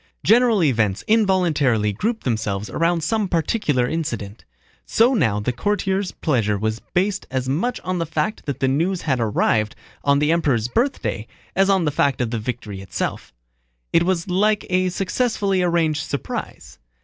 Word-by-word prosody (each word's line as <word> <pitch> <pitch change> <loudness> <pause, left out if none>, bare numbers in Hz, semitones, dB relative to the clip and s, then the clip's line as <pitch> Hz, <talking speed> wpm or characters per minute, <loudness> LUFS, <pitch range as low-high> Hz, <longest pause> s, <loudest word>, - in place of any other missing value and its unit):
General 230 -3 +4
events 110 -9 +1
involuntarily 165 - +2
group 220 - -2
themselves 110 -4 -2
around 165 0 +1
some 215 +4 0
particular 160 - 0
incident. 115 -10 -4 0.4
So 235 +4 +3
now 110 - +2
the 115 +4 -1
courtiers' 195 +6 -1
pleasure 115 -9 0
was 110 +2 -2 0.2
based 195 +2 0
as 130 0 -2
much 170 - -1
on 185 -1 -2
the 165 - -2
fact 160 +7 -2
that 140 -1 -3
the 135 - +3
news 170 +7 0
had 130 -5 0
arrived 110 -1 +1 0.3
on 140 0 +3
the 150 +2 +2
Emperor's 140 -9 +1
birthday 245 - -1 0.3
as 195 +1 +3
on 190 -4 +3
the 150 - +1
fact 140 -2 +1
of 120 -3 -1
the 115 - -1
victory 105 -4 -5
itself. 95 - -4 0.6
It 165 - +5
was 175 0 0
like 205 +3 +1
a 185 0 +2
successfully 195 0 0
arranged 165 -3 +1
surprise. 140 - -6
160 Hz, 160 wpm, -21 LUFS, 120-190 Hz, 0.6 s, It